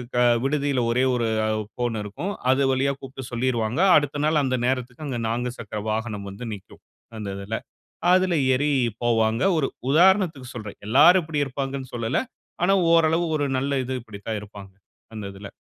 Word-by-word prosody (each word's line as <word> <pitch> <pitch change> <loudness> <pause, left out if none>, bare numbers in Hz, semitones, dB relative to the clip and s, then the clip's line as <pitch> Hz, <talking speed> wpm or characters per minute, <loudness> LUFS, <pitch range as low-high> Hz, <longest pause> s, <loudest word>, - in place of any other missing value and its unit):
க - - +1 0.3
விடுதியில 140 -3 0
ஒரே 125 +2 +2
1 120 -1 0 0.2
அ - - 0 0.2
ஃபோன் 120 -2 -2
இருக்கும். 140 - -5 0.2
அது 135 0 +3
வழியா 140 +1 +1
கூப்பிட்டு 135 -1 -9
சொல்லிருவாங்க. 120 +3 0 0.2
அடுத்த 145 0 -1
நாள் 155 -1 +3
அந்த 130 -1 0
நேரத்துக்கு 125 +2 -3
அங்க 125 -3 -3
4 120 +1 -1
சக்கர 105 -2 -5
வாகனம் 110 -2 -3
வந்து 115 +5 -8
நிக்கும் 95 -1 -16 0.4
அந்த 105 -2 -5
இதில. 105 +3 -3 0.6
அதில 185 -1 +3 0.2
ஏறி 145 +3 +1 0.3
போவாங்க. 115 0 +2
ஒரு 140 - +1 0.2
உதாரணத்துக்கு 170 -4 +3
சொல்றேன், 105 -3 -8
எல்லாரும் 165 +10 +6
இப்படி 155 -2 -2
இருப்பாங்கன்னு 135 -1 -5
சொல்லல. 115 +1 0 0.4
ஆனா 195 +2 +4 0.2
ஓரளவு 165 +1 +3
ஒரு 145 -1 0
நல்ல 140 0 0
இது 130 - -3
இப்படித்தான் 105 -1 -6
இருப்பாங்க, 100 -2 -11 0.4
அந்த 105 - -6
இதில. 100 +1 -9
130 Hz, 160 wpm, -24 LUFS, 110-145 Hz, 0.6 s, எல்லாரும்